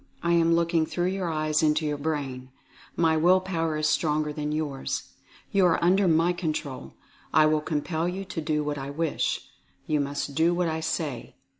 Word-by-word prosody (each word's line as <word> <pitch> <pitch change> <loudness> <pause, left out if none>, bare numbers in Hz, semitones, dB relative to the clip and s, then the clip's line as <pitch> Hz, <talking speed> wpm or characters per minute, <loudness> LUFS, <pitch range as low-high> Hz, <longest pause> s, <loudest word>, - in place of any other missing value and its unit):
I 170 - +1
am 165 0 +4
looking 170 -1 +1
through 175 0 -1
your 190 -2 -2
eyes 155 -1 +1
into 155 0 +2
your 150 -1 -2
brain. 140 -4 -3 0.5
My 165 -1 +3
will 180 +4 +5
power 165 -4 -2
is 155 0 +1
stronger 150 -1 +1
than 150 0 -3
yours. 150 -3 -3 0.4
You 195 -2 +4
are 165 - +1
under 190 +3 +4
my 165 +2 +3
control. 155 -6 -4 0.4
I 155 +1 +5
will 155 0 +2
compel 160 +2 -1
you 190 +2 -5
to 185 -3 -5
do 150 0 0
what 145 -1 -3
I 135 +1 -5
wish. 160 +2 -1 0.4
You 150 -1 +1
must 140 0 -3
do 165 +4 +2
what 175 -1 +1
I 160 0 -2
say. 160 -6 -3
160 Hz, 185 wpm, -26 LUFS, 150-170 Hz, 0.5 s, will